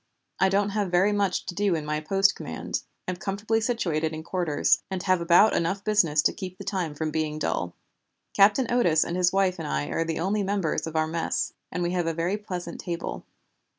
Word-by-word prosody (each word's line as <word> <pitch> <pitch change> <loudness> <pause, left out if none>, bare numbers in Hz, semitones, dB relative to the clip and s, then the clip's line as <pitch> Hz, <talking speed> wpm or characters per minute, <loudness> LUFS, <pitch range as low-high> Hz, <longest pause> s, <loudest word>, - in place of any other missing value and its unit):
I 190 - +4
don't 200 +1 +2
have 205 -2 -1
very 180 +4 +3
much 200 -2 0
to 180 - -5
do 200 -2 +1
in 155 -2 -3
my 150 0 -1
post 195 +5 +2
command, - - -4 0.3
am 185 -1 -2
comfortably 210 +4 -1
situated 170 -10 -1
in 155 0 -6
quarters, 170 -4 +1
and 190 -1 -3
have 185 -2 +2
about 175 +6 +5
enough 190 +4 0
business 170 -9 +3
to - - +3
keep 185 -1 -7
the - - -8
time 175 -6 -2
from 155 +1 -2
being 155 -1 -2
dull. 90 - -2 0.6
Captain 205 +6 +5
Otis 175 -11 +3
and 170 - -4
his 180 0 +3
wife 190 -2 +1
and - - -4
I 70 0 -2
are 165 - 0
the 165 -1 -3
only 200 +5 0
members 195 -5 -1
of 160 - -7
our 155 0 +2
mess, 165 +1 -2 0.2
and 180 - -2
we 175 - 0
have 175 -2 0
a 165 - -1
very 170 +4 0
pleasant 185 -4 -6
table. 170 -1 -5
180 Hz, 215 wpm, -26 LUFS, 160-200 Hz, 0.6 s, about